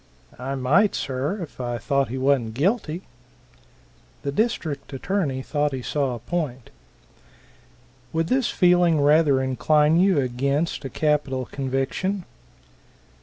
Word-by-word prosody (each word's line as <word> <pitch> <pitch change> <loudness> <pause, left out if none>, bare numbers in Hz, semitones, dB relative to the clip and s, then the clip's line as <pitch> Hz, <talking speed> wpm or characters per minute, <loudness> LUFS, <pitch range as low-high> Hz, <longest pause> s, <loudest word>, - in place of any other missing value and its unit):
"I 135 +2 -3
might, 150 +11 +3
sir, 140 +7 -2
if 145 -4 -9
I 120 -1 -2
thought 140 +4 0
he 130 - -4
wan't 130 -4 +1
guilty." 175 - 0 1.2
The 140 - -1
district 170 - -2
attorney 140 -3 -2
thought 145 0 -1
he 130 -2 -4
saw 135 -3 -1
a - - -6
point. 130 -1 -4 1.4
"Would 165 0 0
this 255 +6 +1
feeling 175 -3 +4
rather 145 -2 +4
incline 150 +4 +3
you 190 -2 +4
against 140 +5 -1
a - - -3
capital 140 -2 0
conviction?" 135 +10 -2
145 Hz, 120 wpm, -24 LUFS, 130-170 Hz, 1.4 s, feeling